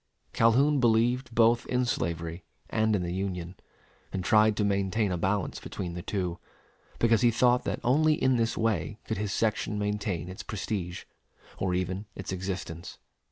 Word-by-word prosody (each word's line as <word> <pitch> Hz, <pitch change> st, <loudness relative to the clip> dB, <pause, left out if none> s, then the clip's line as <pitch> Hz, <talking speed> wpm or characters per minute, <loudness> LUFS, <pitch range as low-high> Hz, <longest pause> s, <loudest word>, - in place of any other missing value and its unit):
Calhoun 135 Hz, +6 st, +4 dB
believed 120 Hz, +2 st, +2 dB
both 115 Hz, +1 st, +4 dB
in 125 Hz, 0 st, +1 dB
slavery 85 Hz, -5 st, -2 dB, 0.3 s
and 110 Hz, -1 st, +2 dB
in 95 Hz, -, -1 dB
the 85 Hz, 0 st, -3 dB
Union, 90 Hz, -2 st, -3 dB, 0.6 s
and 95 Hz, -, -3 dB
tried 110 Hz, +1 st, +4 dB
to 105 Hz, -, +2 dB
maintain 100 Hz, +1 st, +1 dB
a -, -, 0 dB
balance 95 Hz, +2 st, -1 dB
between 90 Hz, -3 st, -5 dB
the 90 Hz, -, -5 dB
two, 90 Hz, -2 st, -3 dB, 0.6 s
because 115 Hz, -1 st, +3 dB
he 120 Hz, -, +5 dB
thought 125 Hz, +2 st, +3 dB
that -, -, -2 dB
only 155 Hz, +6 st, +4 dB
in 130 Hz, -5 st, +2 dB
this 115 Hz, -1 st, 0 dB
way 110 Hz, -1 st, 0 dB
could 110 Hz, -, -3 dB
his 105 Hz, -2 st, -2 dB
section 105 Hz, -1 st, 0 dB
maintain 105 Hz, -4 st, -2 dB
its 90 Hz, +1 st, -7 dB
prestige 95 Hz, -4 st, -4 dB, 0.6 s
or 90 Hz, -1 st, 0 dB
even 95 Hz, +3 st, -2 dB
its 95 Hz, -, -6 dB
existence. 90 Hz, -3 st, -5 dB
105 Hz, 160 wpm, -28 LUFS, 90-115 Hz, 0.6 s, he